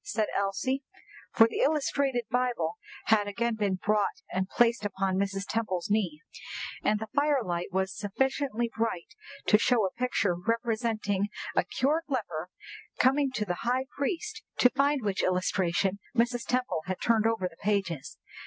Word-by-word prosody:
said 215 Hz, 0 st, 0 dB
Elsie, 200 Hz, +7 st, 0 dB, 0.5 s
for 225 Hz, -2 st, +6 dB
the -, -, -4 dB
illustrated 280 Hz, -4 st, +1 dB
Bible 250 Hz, -, 0 dB, 0.3 s
had 210 Hz, -2 st, +3 dB
again 235 Hz, +3 st, 0 dB
been 205 Hz, -3 st, 0 dB
brought 210 Hz, +1 st, 0 dB
and 185 Hz, +1 st, -1 dB
placed 235 Hz, -2 st, +3 dB
upon 195 Hz, -2 st, -1 dB
Mrs. 195 Hz, 0 st, -1 dB
Temple's 205 Hz, -5 st, -2 dB
knee, 180 Hz, -8 st, 0 dB, 0.6 s
and 210 Hz, 0 st, +2 dB
the 220 Hz, -, -3 dB
firelight 265 Hz, -, +1 dB
was 190 Hz, +1 st, -1 dB
sufficiently 240 Hz, +3 st, -1 dB
bright 225 Hz, -3 st, -2 dB, 0.3 s
to 210 Hz, -, +5 dB
show 235 Hz, -3 st, +3 dB
a 190 Hz, -, -1 dB
picture 240 Hz, -6 st, +1 dB
representing 220 Hz, 0 st, 0 dB, 0.3 s
a -, -, +4 dB
cured 305 Hz, +5 st, 0 dB
leper 185 Hz, -, -3 dB, 0.5 s
coming 275 Hz, +2 st, +3 dB
to 215 Hz, -4 st, -1 dB
the 175 Hz, -3 st, -3 dB
high 250 Hz, +3 st, +1 dB
priest, 355 Hz, +10 st, -2 dB, 0.2 s
to 250 Hz, -, +6 dB
find 280 Hz, 0 st, +2 dB
which 200 Hz, -2 st, 0 dB
illustration 185 Hz, +1 st, +1 dB, 0.2 s
Mrs. 240 Hz, +1 st, +1 dB
Temple 250 Hz, -9 st, 0 dB
had 185 Hz, -1 st, -2 dB
turned 225 Hz, -2 st, +3 dB
over 225 Hz, -5 st, 0 dB
the 165 Hz, -2 st, -14 dB
pages. 190 Hz, -8 st, -1 dB
220 Hz, 150 wpm, -29 LUFS, 195-250 Hz, 0.6 s, for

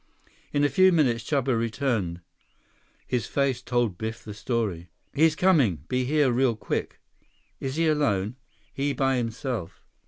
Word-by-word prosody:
In 145 Hz, -, +1 dB
a -, -, +5 dB
few 185 Hz, +7 st, +5 dB
minutes 130 Hz, -9 st, +2 dB
Chuba 135 Hz, -2 st, 0 dB
returned. 115 Hz, -7 st, -1 dB, 0.8 s
His 125 Hz, -3 st, -1 dB
face 135 Hz, -3 st, 0 dB
told 120 Hz, -7 st, -1 dB
Biff 110 Hz, 0 st, -5 dB
the 105 Hz, -, -7 dB
story. 105 Hz, -5 st, -2 dB, 0.2 s
"He's 155 Hz, +2 st, +4 dB
coming. 140 Hz, -, +3 dB
Be 125 Hz, 0 st, 0 dB
here 145 Hz, -1 st, +3 dB
real 125 Hz, -1 st, +2 dB
quick." -, -, -4 dB, 0.6 s
"Is 135 Hz, 0 st, -4 dB
he 165 Hz, +1 st, +1 dB
alone?" 120 Hz, -9 st, +1 dB, 0.4 s
"He 140 Hz, +1 st, -1 dB
by 135 Hz, -1 st, +1 dB
himself." 115 Hz, -, -4 dB
125 Hz, 145 wpm, -26 LUFS, 110-140 Hz, 0.8 s, a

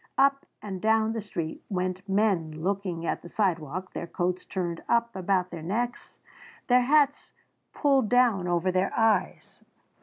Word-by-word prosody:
Up 275 Hz, 0 st, +3 dB, 0.2 s
and 190 Hz, -3 st, -5 dB
down 220 Hz, 0 st, +2 dB
the 225 Hz, -, -3 dB
street 170 Hz, -6 st, -5 dB
went 185 Hz, 0 st, -3 dB
men 180 Hz, -6 st, 0 dB
looking 185 Hz, -3 st, -2 dB
at -, -, -2 dB
the 175 Hz, -, -11 dB
sidewalk, 180 Hz, -2 st, -2 dB
their 170 Hz, -, -5 dB
coats 180 Hz, +1 st, -2 dB
turned 175 Hz, -3 st, -3 dB
up 235 Hz, -1 st, +1 dB
about 185 Hz, -1 st, 0 dB
their 170 Hz, -2 st, -6 dB
necks, 235 Hz, +9 st, -3 dB, 0.5 s
their 250 Hz, 0 st, +5 dB
hats 285 Hz, +2 st, +2 dB, 0.4 s
pulled 270 Hz, -6 st, +2 dB
down 240 Hz, -7 st, +3 dB
over 175 Hz, +1 st, +1 dB
their 185 Hz, +1 st, +1 dB
eyes. 220 Hz, -4 st, 0 dB
195 Hz, 150 wpm, -27 LUFS, 175-225 Hz, 0.5 s, their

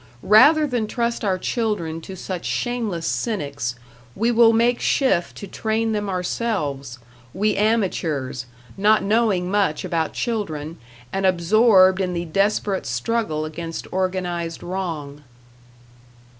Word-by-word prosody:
Rather 295 Hz, +9 st, +6 dB
than 245 Hz, -6 st, -1 dB
trust 235 Hz, 0 st, -2 dB
our 190 Hz, -3 st, +1 dB
children 185 Hz, -7 st, -2 dB
to 190 Hz, +3 st, -9 dB
such 185 Hz, -1 st, -5 dB
shameless 225 Hz, -9 st, -2 dB
cynics, 145 Hz, -, -2 dB, 0.4 s
we 230 Hz, +3 st, +1 dB
will 230 Hz, -1 st, +6 dB
make 235 Hz, +2 st, +2 dB
shift 260 Hz, -11 st, +1 dB
to -, -, -7 dB
train 220 Hz, +3 st, -1 dB
them 205 Hz, -2 st, -2 dB
ourselves 180 Hz, -, -2 dB, 0.4 s
we 210 Hz, +2 st, +1 dB
amateurs, 170 Hz, -, -1 dB, 0.3 s
not 210 Hz, +2 st, +4 dB
knowing 200 Hz, -4 st, +1 dB
much 195 Hz, -6 st, +1 dB
about 165 Hz, -3 st, -1 dB
children, 165 Hz, -9 st, -3 dB, 0.3 s
and 195 Hz, 0 st, +1 dB
absorbed 190 Hz, +1 st, +4 dB
in 180 Hz, -1 st, -1 dB
the 170 Hz, 0 st, -3 dB
desperate 195 Hz, +3 st, 0 dB
struggle 155 Hz, -, -1 dB
against 165 Hz, +1 st, -6 dB
organized 180 Hz, -3 st, -2 dB
wrong. 160 Hz, -6 st, -5 dB
190 Hz, 120 wpm, -22 LUFS, 165-220 Hz, 0.4 s, Rather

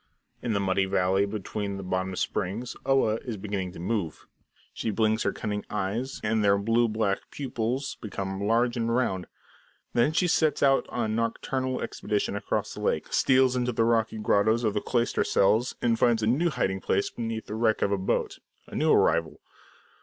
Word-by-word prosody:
In 120 Hz, -, -1 dB
the 100 Hz, -, +1 dB
muddy 95 Hz, 0 st, +1 dB
valley 95 Hz, +1 st, +2 dB
between 100 Hz, -1 st, -4 dB
the 95 Hz, -, -6 dB
bottom 95 Hz, 0 st, -2 dB
springs, 105 Hz, +7 st, -2 dB
Oa 135 Hz, -5 st, +3 dB
is 115 Hz, -2 st, -6 dB
beginning 95 Hz, -2 st, -3 dB
to -, -, -10 dB
move. 90 Hz, -4 st, -3 dB, 0.5 s
She -, -, -3 dB
blinks 110 Hz, +1 st, +1 dB
her -, -, +1 dB
cunning 105 Hz, -1 st, -4 dB
eyes, 105 Hz, +6 st, -3 dB
and 110 Hz, 0 st, +1 dB
their 100 Hz, -1 st, +4 dB
blue 115 Hz, +4 st, +2 dB
black 110 Hz, -3 st, 0 dB
pupils 130 Hz, 0 st, -3 dB
become 95 Hz, -2 st, -4 dB
large 120 Hz, +3 st, +2 dB
and 115 Hz, -1 st, -1 dB
round. 95 Hz, -8 st, 0 dB, 0.7 s
Then 120 Hz, +5 st, +3 dB
she 170 Hz, +3 st, +2 dB
sets 160 Hz, -2 st, +2 dB
out 135 Hz, -1 st, +4 dB
on 115 Hz, -3 st, -1 dB
a -, -, -1 dB
nocturnal 130 Hz, +3 st, -1 dB
expedition 105 Hz, -1 st, -2 dB
across 100 Hz, -, -2 dB
the -, -, -8 dB
lake, -, -, -1 dB
steals 130 Hz, -1 st, +4 dB
into 125 Hz, 0 st, 0 dB
the 115 Hz, 0 st, +2 dB
rocky 115 Hz, -1 st, +1 dB
grottos 110 Hz, +2 st, +2 dB
of 110 Hz, -3 st, +1 dB
the 105 Hz, -, -1 dB
cloister 120 Hz, -1 st, 0 dB
cells, 110 Hz, +5 st, +2 dB
and 115 Hz, -2 st, +2 dB
finds 115 Hz, -2 st, +3 dB
a -, -, +3 dB
new 140 Hz, +10 st, +2 dB
hiding 95 Hz, -, -1 dB
place 100 Hz, -, 0 dB
beneath 115 Hz, -1 st, -4 dB
the -, -, -7 dB
wreck 110 Hz, 0 st, +1 dB
of 100 Hz, -, +1 dB
a 100 Hz, -, +2 dB
boat 95 Hz, -, -1 dB, 0.3 s
a -, -, -15 dB
new -, -, +2 dB
arrival. 80 Hz, -1 st, +2 dB
110 Hz, 185 wpm, -27 LUFS, 100-120 Hz, 0.7 s, their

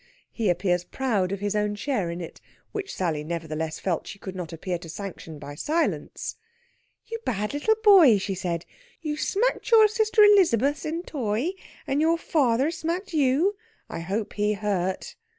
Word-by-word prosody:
He 220 Hz, -4 st, 0 dB
appears 175 Hz, 0 st, +1 dB
proud 200 Hz, -3 st, -1 dB
of 200 Hz, 0 st, -3 dB
his 205 Hz, 0 st, -1 dB
own 210 Hz, 0 st, 0 dB
share 205 Hz, -6 st, -1 dB
in 170 Hz, +1 st, -5 dB
it, 165 Hz, -, -9 dB, 0.3 s
which 405 Hz, -2 st, -4 dB
Sally 160 Hz, -5 st, -1 dB
nevertheless 160 Hz, -1 st, -4 dB
felt 180 Hz, -4 st, -2 dB
she -, -, -8 dB
could 190 Hz, -1 st, -8 dB
not 175 Hz, -2 st, -5 dB
appear 175 Hz, +2 st, -4 dB
to 165 Hz, -, -10 dB
sanction 165 Hz, -3 st, -7 dB
by 145 Hz, 0 st, -8 dB
silence. 315 Hz, -, -2 dB, 0.7 s
"You 455 Hz, 0 st, -5 dB
bad 210 Hz, -, -2 dB
little 365 Hz, +10 st, +2 dB
boy," 360 Hz, -, +8 dB
she 195 Hz, 0 st, -2 dB
said. 175 Hz, -2 st, -3 dB, 0.4 s
"You 300 Hz, -2 st, -2 dB
smacked 430 Hz, +10 st, 0 dB
your 445 Hz, -2 st, +8 dB
sister 435 Hz, 0 st, +3 dB
Elizabeth 310 Hz, -, +4 dB
in 330 Hz, +3 st, -3 dB
t' 330 Hz, -, -13 dB
oy, 240 Hz, -, 0 dB, 0.3 s
and 280 Hz, +2 st, 0 dB
your 330 Hz, +1 st, +3 dB
foarther 275 Hz, -3 st, +2 dB
smacked 340 Hz, +3 st, -3 dB
you. 305 Hz, +7 st, +3 dB, 0.3 s
I 170 Hz, -, -5 dB
hope 195 Hz, +6 st, -3 dB
he 210 Hz, 0 st, +1 dB
hurt." 195 Hz, -3 st, -2 dB
210 Hz, 170 wpm, -26 LUFS, -, 0.7 s, boy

